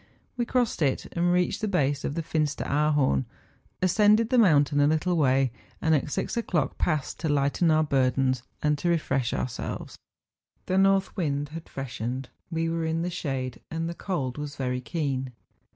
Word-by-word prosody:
We 240 Hz, -2 st, -1 dB
crossed 245 Hz, -8 st, 0 dB
it, 135 Hz, -3 st, +1 dB
and 175 Hz, +1 st, +2 dB
reached 180 Hz, +4 st, +1 dB
the 215 Hz, -, 0 dB
base 145 Hz, -7 st, +1 dB
of 145 Hz, -, -2 dB
the 165 Hz, -, -2 dB
Finsteraarhorn, 150 Hz, -, +1 dB, 0.6 s
as¬ -, -, +5 dB
cended 215 Hz, +3 st, +4 dB
the 255 Hz, -, +4 dB
moimtain 145 Hz, -9 st, +4 dB
a -, -, +5 dB
little 160 Hz, +4 st, +1 dB
way, 135 Hz, -4 st, +3 dB, 0.3 s
and 160 Hz, -, +2 dB
at 150 Hz, 0 st, +1 dB
six -, -, -2 dB
o'clock 170 Hz, -, -1 dB
passed 155 Hz, -5 st, -1 dB
to 160 Hz, -, -1 dB
lighten 145 Hz, +4 st, +2 dB
our 155 Hz, 0 st, +4 dB
burdens 130 Hz, -2 st, +1 dB, 0.2 s
and 150 Hz, -1 st, +2 dB
to 175 Hz, -, 0 dB
refresh 140 Hz, -7 st, +1 dB
our¬ -, -, -1 dB
selves. 120 Hz, -, -6 dB, 0.7 s
The 185 Hz, +1 st, +1 dB
north 195 Hz, 0 st, +3 dB
wind 145 Hz, -6 st, -1 dB
had 165 Hz, +2 st, -8 dB
freshened; 130 Hz, -1 st, -4 dB, 0.2 s
we 165 Hz, 0 st, -1 dB
were 165 Hz, 0 st, -1 dB
in 160 Hz, +1 st, -1 dB
the 180 Hz, -, -2 dB
shade, 130 Hz, -6 st, -3 dB
and 165 Hz, +1 st, -2 dB
the 170 Hz, -, -3 dB
cold 150 Hz, -8 st, -3 dB
was 145 Hz, -1 st, -5 dB
very 125 Hz, -1 st, -2 dB
keen. 135 Hz, -4 st, -2 dB
150 Hz, 180 wpm, -27 LUFS, 135-170 Hz, 0.7 s, as¬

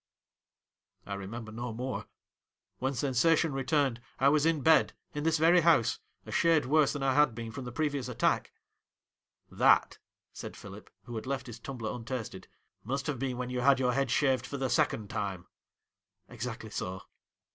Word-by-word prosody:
' -, -, -48 dB
I 100 Hz, -, -5 dB
remember 110 Hz, +3 st, -6 dB
no 120 Hz, +2 st, -5 dB
more. 125 Hz, +3 st, -4 dB, 0.7 s
When 135 Hz, +1 st, -1 dB
sensation 145 Hz, +5 st, +2 dB
re 135 Hz, 0 st, -2 dB
turned, 130 Hz, -3 st, +1 dB, 0.2 s
I 135 Hz, -, +4 dB
was 150 Hz, +1 st, +3 dB
in 160 Hz, -3 st, +1 dB
bed, 160 Hz, 0 st, +4 dB, 0.2 s
in 150 Hz, -, -3 dB
this 165 Hz, 0 st, +3 dB
very 170 Hz, +3 st, +5 dB
house, 120 Hz, -9 st, +3 dB, 0.3 s
a -, -, -9 dB
shade 165 Hz, -4 st, +3 dB
worse 150 Hz, +2 st, +3 dB
than 145 Hz, -2 st, -4 dB
I 135 Hz, -1 st, +2 dB
had 145 Hz, -4 st, +4 dB
been 115 Hz, -1 st, -6 dB
from 130 Hz, +2 st, -7 dB
the 125 Hz, -, -6 dB
previous 145 Hz, -1 st, -1 dB
attack.' 125 Hz, -, 0 dB, 0.5 s
' -, -, -48 dB
That,' -, -, +5 dB, 0.3 s
said -, -, -8 dB
Philip, -, -, -11 dB
who 120 Hz, -, -9 dB
had 110 Hz, -, -6 dB
left 135 Hz, -1 st, -2 dB
his 115 Hz, -2 st, -9 dB
tum 135 Hz, +3 st, -7 dB
bler 110 Hz, 0 st, -4 dB
untasted, 115 Hz, -5 st, -6 dB, 0.2 s
' -, -, -49 dB
must 135 Hz, +5 st, -3 dB
have 150 Hz, -5 st, -2 dB
been 130 Hz, -2 st, -2 dB
when 125 Hz, 0 st, -4 dB
you 125 Hz, -, -2 dB
had 135 Hz, +1 st, +5 dB
your 125 Hz, -1 st, +2 dB
head 135 Hz, 0 st, 0 dB
shaved 130 Hz, -2 st, +2 dB
for 140 Hz, -, -5 dB
the 130 Hz, -2 st, -1 dB
second 105 Hz, -2 st, +1 dB
time.' 100 Hz, -5 st, -3 dB, 0.5 s
' -, -, -54 dB
Exactly 115 Hz, -2 st, -6 dB
so.' 95 Hz, -2 st, -4 dB
130 Hz, 190 wpm, -30 LUFS, 115-145 Hz, 0.7 s, very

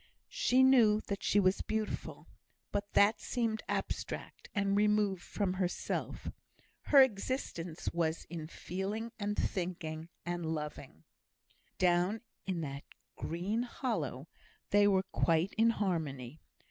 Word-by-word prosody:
She 260 Hz, -, +4 dB
knew 235 Hz, -5 st, +6 dB
that 200 Hz, -2 st, -4 dB
she 205 Hz, -, +3 dB
was 185 Hz, -1 st, +3 dB
beautiful; 215 Hz, 0 st, -3 dB, 0.5 s
but 205 Hz, 0 st, -2 dB
that 205 Hz, +2 st, +5 dB
seemed 225 Hz, -3 st, -1 dB
abstract, -, -, -4 dB
and 200 Hz, -1 st, +2 dB
removed 210 Hz, -2 st, +3 dB
from 195 Hz, 0 st, -1 dB
herself. 185 Hz, -1 st, -2 dB, 0.6 s
Her 280 Hz, -2 st, +8 dB
existence 195 Hz, -, -3 dB
was 165 Hz, -1 st, 0 dB
in 165 Hz, -2 st, -6 dB
feeling, 200 Hz, +7 st, -4 dB
and 210 Hz, 0 st, -2 dB
thinking, 165 Hz, -3 st, -2 dB, 0.2 s
and 175 Hz, 0 st, -2 dB
loving. 145 Hz, -, -7 dB, 0.7 s
Down 180 Hz, +4 st, +2 dB, 0.3 s
in 180 Hz, -3 st, -1 dB
that 140 Hz, -2 st, -5 dB, 0.3 s
green 190 Hz, +8 st, -2 dB
hollow 170 Hz, -, -3 dB, 0.4 s
they 205 Hz, 0 st, +6 dB
were 190 Hz, -2 st, +3 dB
quite 170 Hz, -1 st, +1 dB
in 225 Hz, +1 st, +4 dB
harmony. 155 Hz, -, -2 dB
195 Hz, 120 wpm, -33 LUFS, 170-215 Hz, 0.7 s, Her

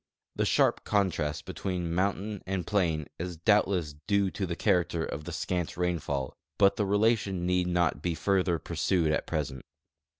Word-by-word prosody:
The -, -, +1 dB
sharp -, -, +3 dB
contrast 90 Hz, -7 st, 0 dB
between 90 Hz, -3 st, -3 dB
mountain 100 Hz, +2 st, -1 dB
and 95 Hz, -3 st, -2 dB
plain 85 Hz, -7 st, +1 dB
is 90 Hz, 0 st, -4 dB
doubtless 90 Hz, -4 st, +2 dB
due 100 Hz, -2 st, +2 dB
to 95 Hz, -3 st, -3 dB
the 85 Hz, -, -3 dB
character 90 Hz, -5 st, +1 dB
of 75 Hz, +2 st, -6 dB
the -, -, -5 dB
scant 90 Hz, -3 st, -2 dB
rainfall; 80 Hz, -7 st, -1 dB, 0.2 s
but 100 Hz, -1 st, +5 dB
the 105 Hz, -, 0 dB
relation 100 Hz, -3 st, +2 dB
need 90 Hz, 0 st, +1 dB
not 85 Hz, -4 st, +1 dB
he 85 Hz, -2 st, 0 dB
further 90 Hz, +1 st, +1 dB
pursued 80 Hz, +1 st, 0 dB
at -, -, -1 dB
present. 70 Hz, -5 st, -3 dB
90 Hz, 160 wpm, -29 LUFS, 80-100 Hz, 0.2 s, but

